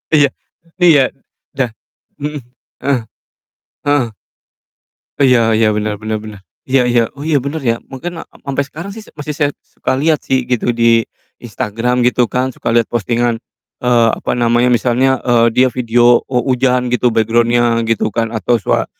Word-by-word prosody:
Iya 145 -2 +5 0.5
iya, 160 -5 +6 0.6
da 135 - +2 0.6
mhm, 150 -1 -4 0.4
heeh, 135 -2 +1 0.9
heeh. 130 -7 +1 1.0
Iya 125 -5 +4
iya, 110 -1 +3
benar 105 0 -2
benar 110 0 -4
benar, 105 -2 -10 0.3
iya 130 -1 +3
iya, 120 -2 +2
oh, 145 - -7
iya, 150 -4 +2
bener, 140 +4 -4
ya, 115 0 0
mungkin 165 +6 -6
ak - - -15 0.2
sampe 140 0 -1
sekarang 165 +7 -7
sih 220 - -9
se 215 - -16
masih 150 +1 -5
saya 145 -1 +1 0.2
suka 130 - -3
liat 155 +1 +1
sih, 130 -2 0
gitu, 125 -1 -1
di 115 -1 +3 0.4
Instagram, 120 +3 -1
gitu 125 -2 +2
kan, 130 +1 -1
suka - - -4
liat 115 -1 +3
postingan, 120 +1 -1 0.4
eee, 120 -2 +3
apa - - -3
namanya, 120 +1 +2
misalnya, 125 +2 +2
eee, 115 -1 +4
dia 130 +3 +3
video 120 0 +3
o 125 -2 -2
hujan 125 -1 +1
gitu, 125 0 +2
background-nya 115 +1 +2
gitu 110 -2 0
kan, 115 -1 0
atau 115 0 0
sua - - 0
120 Hz, 160 wpm, -16 LUFS, 115-135 Hz, 1.0 s, iya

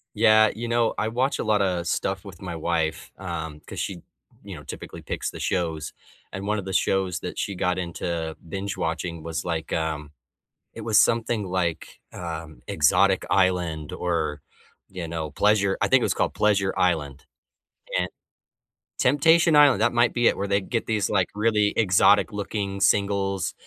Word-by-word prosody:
Yeah, 110 0 +6
you 120 +2 -4
know, 115 -1 +1
I 110 - 0
watch 125 +5 0
a - - -1
lotta 100 -5 +1
stuff 85 - -2
with - - -11
my 90 -2 -5
wife, 80 -1 -2
um, 80 -5 -5
'cause - - -7
she, 95 - -3 0.5
you - - -8
know, - - -10
typically - - -8
picks - - -4
the - - -9
shows. 80 -5 -2 0.4
And 95 +1 -6
one 105 +1 +1
of 100 - -5
the 95 - -5
shows 95 -1 +1
that 90 - -6
she 100 - -2
got 90 0 0
into 85 -2 -3
binge-watching 85 -3 -3
was, 80 0 -4
like, 80 -2 -3
um, 80 -2 -2 0.6
it 115 - -8
was 110 -1 +3
something 115 -2 +1
like, 90 -3 -3
um, 80 -6 -7
Exotic 95 -1 +3
Island 90 -5 +1
or, 80 -4 -2 0.5
you 90 -3 -6
know, 80 -2 -4
Pleasure 100 +3 +2
I - - +3
think - - +4
it - - 0
was - - +1
called - - -1
Pleasure 100 -2 +2
Island. 75 -6 0 0.7
And - - 0 0.9
Temptation 160 +4 +4
Island, 145 -7 +6
that 120 +1 +3
might 120 0 +3
be 120 -1 +3
it, - - +3
where 100 - -2
they 100 0 +2
get 115 +4 -3
these, 105 -3 0
like, 95 -2 +2
really 105 -1 +2
exotic 95 -6 +4
looking 100 -1 -3
singles 100 -2 +1
95 Hz, 170 wpm, -25 LUFS, 85-105 Hz, 0.9 s, Yeah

